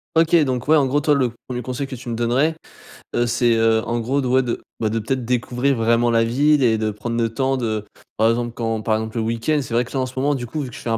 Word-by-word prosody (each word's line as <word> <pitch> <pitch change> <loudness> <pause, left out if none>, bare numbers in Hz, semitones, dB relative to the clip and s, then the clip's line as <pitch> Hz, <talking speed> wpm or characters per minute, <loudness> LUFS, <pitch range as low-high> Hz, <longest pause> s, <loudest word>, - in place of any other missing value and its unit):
OK 165 +1 +3
donc 125 -1 -2
ouais 155 - +5
en 140 -3 +3
gros 145 +3 +1
toi 150 0 +2
le 130 -3 +2 0.2
1er 125 -1 -4
conseil 130 +3 -4
que 135 - -7
tu 125 0 -9
me 115 - -2
donnerais, 125 +7 +1 0.6
heu, 120 - +2
c'est, 120 0 +2
heu, 115 0 +3
en 120 +1 -1
gros 130 +5 0
de 135 - -1
ouais 130 +1 +4
de 120 -2 -4 0.2
bah 110 - 0
de 115 - -2
peut-être 125 +3 -2
découvrir 125 +3 0
vraiment 115 +1 +2
la 115 0 +3
ville 140 +5 +3
et 110 -3 +3
de 110 0 0
prendre 105 +3 -4
le 115 - +1
temps, 135 +3 0
de, 110 -4 -2 0.3
par 110 +1 +4
exemple 120 0 -2
quand 115 -2 -2
par 110 0 +1
exemple 110 +1 -4
le 115 - 0
week-end 115 +7 0
c'est 120 -3 -4
vrai 120 +1 +2
que - - -13
là 135 - -1
en 130 - 0
ce 130 +1 -6
moment 145 +2 +2
du 120 -3 -4
coup 155 +5 -4
vu 130 - -5
que - - -11
je - - -9
fais - - -4
un 115 - +1
120 Hz, 300 wpm, -21 LUFS, 115-135 Hz, 0.6 s, ouais